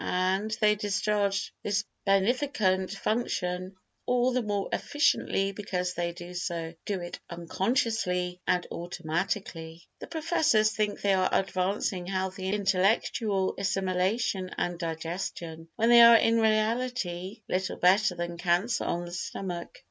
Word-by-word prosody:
And 190 +3 0
they 210 -1 +5
discharge 205 -1 0
this 200 -1 0 0.2
beneficent 195 -2 +2
function 190 -3 -2 0.3
all 250 0 +2
the 255 - +1
more 205 -3 -2
efficiently 200 -9 +1
because 180 -3 -3
they 170 0 -2
do 175 +1 -5
it 175 0 -7
unconsciously 180 0 -1
and 180 -1 +2
automatically. 170 0 -4 0.2
The - - -8
professors 310 -9 +2
think 210 -1 -1
they 200 -1 +3
are 185 -1 +2
advancing 190 -1 0
healthy 190 0 -2
intellectual 195 0 +1
assimilation 190 +1 0
and 175 -1 -2
digestion 165 0 -5
when 230 +1 +2
they 240 0 +9
are 235 0 +10
in 230 +1 +3
reality 215 -4 0
little 185 +1 -1
better 190 +2 +4
than 175 0 -4
cancer 180 +7 +1
on 175 0 -2
the 175 - -9
stomach. 175 0 -5
190 Hz, 120 wpm, -28 LUFS, 180-215 Hz, 0.3 s, are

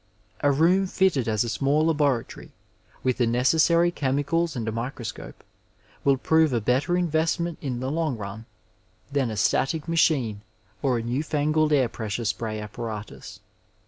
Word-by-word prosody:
A 145 - +3
room 175 +7 +3
fitted 180 -10 +1
as 110 0 +1
a - - -4
small 140 +7 +1
laboratory, 145 -7 0 0.5
with 130 -1 +1
the 120 - +3
necessary 160 +8 +3
chemicals 150 +3 0
and 115 -3 -3
a - - 0
microscope, 115 0 -6 0.6
will 140 -1 +3
prove 160 +2 +3
a 120 - +2
better 130 - +1
investment 170 0 0
in 125 -4 -3
the 130 +1 -2
long 155 -5 -1
run 105 +2 -7 0.6
than 140 -4 0
a 110 - -5
static 145 +9 +1
machine 135 -10 +1 0.4
or 130 -4 +1
a 115 - -3
new 125 +5 -1
hngled 155 0 +1
air 135 -4 +4
pressure 115 0 -4
spray 110 0 -2
apparatus. 105 0 -7
135 Hz, 150 wpm, -25 LUFS, 115-160 Hz, 0.6 s, air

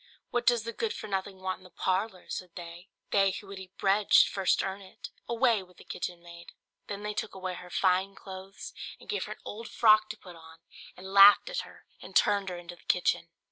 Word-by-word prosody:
"What 240 0 -1
does 240 -3 +4
the 230 +1 -5
good 455 - -2
for - - -7
nothing 195 -1 -3
thing 185 - -19
want 185 0 -2
in - - -19
the 185 - -14
parlour?" 185 +1 -1
said 180 -2 -6
they; 175 +1 -9 0.2
"they 195 -1 +4
who 195 - -6
would 195 0 -8
eat 190 0 -12
bread 200 +1 +1
should - - +7
first 195 -2 +2
earn 195 +1 -4
it; 190 -1 -11 0.2
away 235 -2 +2
with 180 -1 -17
the - - -14
kitchen 175 -1 -5
maid!" 170 0 -12 0.3
Then 205 0 -5
they 210 0 -3
took 215 -1 -4
away 185 -1 -4
her 180 0 -9
fine 185 +2 +1
clothes, 190 +1 -9 0.3
and - - -16
gave 420 - -2
her - - -5
an - - -23
old 225 +2 -7
frock 215 -1 +5
to 220 - -6
put 180 -4 -13
on, 160 0 -14 0.4
and 190 +1 -9
laughed 200 - +8
at - - -1
her - - -10 0.2
and - - -12
turned 200 -2 +3
her 180 - -5
into 175 0 -9
the - - -23
kitchen. 175 -1 +1
195 Hz, 235 wpm, -29 LUFS, 180-210 Hz, 0.4 s, laughed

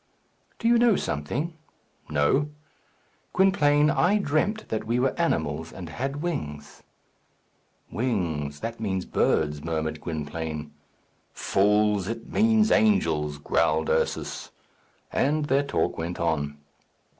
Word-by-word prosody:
"Do 230 - -1
you 235 0 +5
know 235 -3 +5
something?" 125 - -2 0.6
"No." 75 - +2 0.8
"Gwynplaine, 150 -6 +4
I 200 +4 +3
dreamt 205 +5 0
that 110 - -2
we 120 +2 +1
were 130 +1 +2
animals, 80 - -1
and 90 -4 -8
had 135 - -4
wings." 75 - -5 1.1
"Wings; 80 - -2
that 115 0 -4
means 95 -4 -2
birds," 75 -1 +1
murmured 80 -1 -2
Gwynplaine. 75 -1 -4 0.6
"Fools! 105 -1 +2
it 115 +1 -5
means 220 0 +3
angels," 80 -8 +2
growled 80 +2 +1
Ursus. - - -1 0.6
And 150 +2 +1
their 140 0 +3
talk 140 - -1
went 85 +2 -4
on. 75 -3 -1
100 Hz, 110 wpm, -26 LUFS, -, 1.1 s, you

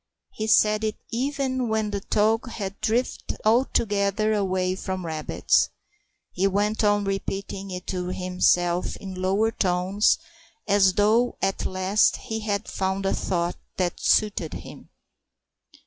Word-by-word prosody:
He 215 - -4
said 215 0 +4
it 215 -1 -1 0.2
even 260 0 -1
when 220 -1 0
the 200 - -2
talk 220 +4 +1
had 200 -3 -6
drifted 240 +3 -1
altogether 215 -3 +2
away 185 -3 0
from 185 -1 -4
rabbits. 155 -2 +1 0.6
He 190 +2 +1
went 205 +3 0
on 205 0 +3
repeating 195 0 -4
it 180 -1 -6
to 180 -1 -3
himself 180 -1 +1
in 190 -1 -8
lower 195 +4 +1
tones, 185 +1 +2 0.5
as 200 -2 +4
though 220 +5 +2
at 195 0 -1
last 185 +3 +2
he 220 0 -5
had 205 -2 -2
found 190 0 -2
a 195 - +2
thought 175 -1 -1 0.2
that 180 -2 -1
suited 205 -7 +1
him. - - -10
200 Hz, 130 wpm, -25 LUFS, 185-215 Hz, 0.6 s, said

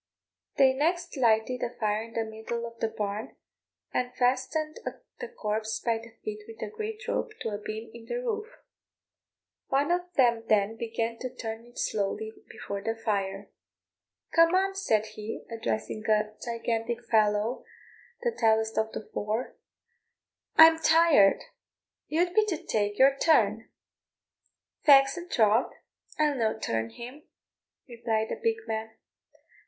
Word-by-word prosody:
They 265 -1 +6
next 340 +6 0
lighted 240 -1 +2
a 240 - -3
fire 210 -1 +1
in 230 0 -10
the 230 - +1
middle 220 +2 -5
of 230 0 -10
the 225 - +1
barn, 210 0 -4 0.6
and 250 0 -1
fastened 265 +5 0 0.4
the 485 - -4
corpse 220 - -3
by 230 -1 0
the 230 0 -14
feet 425 -1 -4
with 455 -1 -11
a 440 - -7
great 440 +1 -5
rope 455 - -2
to - - -2
a 205 -1 -4
beam 220 +2 -6
in 230 -1 -12
the - - -3
roof. 455 -3 -2 1.2
One 285 +4 +1
of 355 0 -1
them 235 -3 +3
then 210 0 +3
began 230 0 -3
to 255 - -4
turn 225 -1 -6
it 240 - -18
slowly 215 +1 -2 0.2
before 200 0 -6
the 225 +2 -2
fire. 200 -3 -2 0.8
"Come 330 +1 +5
on," 390 +1 +2
said 220 - +1
he, 215 0 -7
addressing 115 - -3
a 215 0 +2
gigantic 230 0 -2
fellow, 215 +2 +2 0.6
the 480 - +2
tallest 220 - +2
of 220 0 -1
the - - -6
four 215 +4 -2 1.0
"I'm 320 0 +9
tired; 320 -11 +5 0.6
you 335 +4 +2
be 435 - +5
to 355 -6 -1
tak' 205 -6 -1
your 270 +1 +6
turn." 320 -1 +3 1.1
"Faix 275 -2 +6
an' 350 0 -8
troth, 220 +1 +3 0.5
I'll 300 -1 +3
no 225 -5 0
turn 115 0 -2
him," 250 - -10 0.6
replied 230 -2 -1
the - - -4
big 450 -1 0
man. 220 0 -4
230 Hz, 145 wpm, -28 LUFS, 220-305 Hz, 1.2 s, I'm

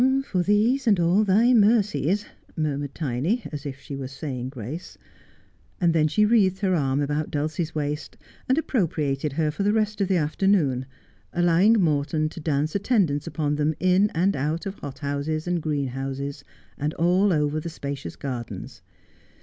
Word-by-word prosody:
' 270 - 0
For 185 - +2
these 225 +8 +2
and 200 -5 +4
all 175 +5 +3
Thy 220 +5 +4
mercies 210 - +3
— - - -36
' - - -28
murmured 145 -2 -2
Tiny, 155 - -1
as 145 -1 -5
if 135 -1 -7
she 140 - -7
were 135 -1 -5
saying 130 -2 -5
grace. 130 - -7 0.8
And 170 -3 +3
then 155 -2 +3
she 210 +8 +3
wreathed 200 -4 +3
her 190 -2 +2
arm 140 -4 +1
round 150 +2 -1
Dulcie's 155 +2 -2
waist, 150 0 -3 0.3
and 260 - +3
appropriated 150 - 0
her 155 0 0
for 160 - -5
the 205 +1 +3
rest 215 -1 0
of 195 - +2
the 190 -1 +2
afternoon, 150 -5 +1 0.5
allowing 175 +6 +4
Morton 155 -2 +1
to 165 - -10
dance 150 -1 -1
attendance 195 - +1
upon 150 -2 -1
them 150 +1 +1
in 185 +3 +3
and 185 +4 +2
out 155 +7 -2
of 195 0 -6
hothouses 145 +3 -3
and 175 -1 0
greenhouses, 140 -1 -3 0.4
and 150 +2 -2
all 180 +4 +3
over 150 -1 +1
the 170 - -5
spacious 140 -3 -6
gardens. 125 -5 -6
155 Hz, 170 wpm, -25 LUFS, 145-195 Hz, 0.8 s, and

